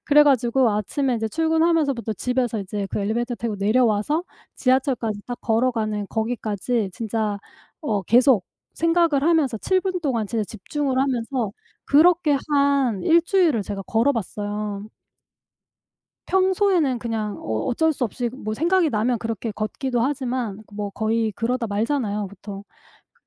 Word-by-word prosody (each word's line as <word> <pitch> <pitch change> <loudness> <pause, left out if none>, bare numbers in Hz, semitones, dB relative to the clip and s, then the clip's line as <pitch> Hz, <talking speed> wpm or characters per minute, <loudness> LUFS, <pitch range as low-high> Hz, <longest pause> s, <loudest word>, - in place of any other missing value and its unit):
그래 295 0 +6
가지고 255 -3 +3
아침에 250 +6 -1
이제 225 -1 -2
출근하면서부터 320 -5 +1
집에서 250 +1 -1
이제 200 +1 -4
그 - - -2
엘리베이터 235 +4 -1
타고 230 -2 -3
내려와서 220 - +2 0.3
지하철까지 255 -5 +1
딱 245 -1 -5
걸어가는 220 -3 0
거기까지 220 -1 -2
진짜 215 -1 -2 0.4
어 210 -9 -1
계속 240 0 +4 0.3
생각을 330 -4 +2
하면서 300 -7 +2
7 375 - +1
분 370 -1 -2
동안 250 -9 -1
진짜 225 +1 -1
집중을 260 +7 -3
하면서 250 -4 -1 0.3
그렇게 315 0 +4
한 280 -8 +2
1 335 - +5
주일을 340 - +2
제가 200 0 -5
걸어 230 +8 +2
봤어요. 205 -2 -4 1.4
평소에는 375 -7 +2
그냥 220 -3 -3
어 110 0 -2
어쩔 320 +6 +2
수 265 - -2
없이 240 +1 -2
뭐 235 -5 -5
생각이 340 +4 +2
나면 230 +2 +1
그렇게 225 0 -4
걷기도 240 +4 -2
하지만 250 -5 -2
뭐 205 0 -4
거의 220 +1 0
그러다 235 +2 -1
말잖아요 210 -1 -1
보통. 200 +1 -9 0.5
그래 - - -38
240 Hz, 320 characters per minute, -23 LUFS, 215-280 Hz, 1.4 s, 그래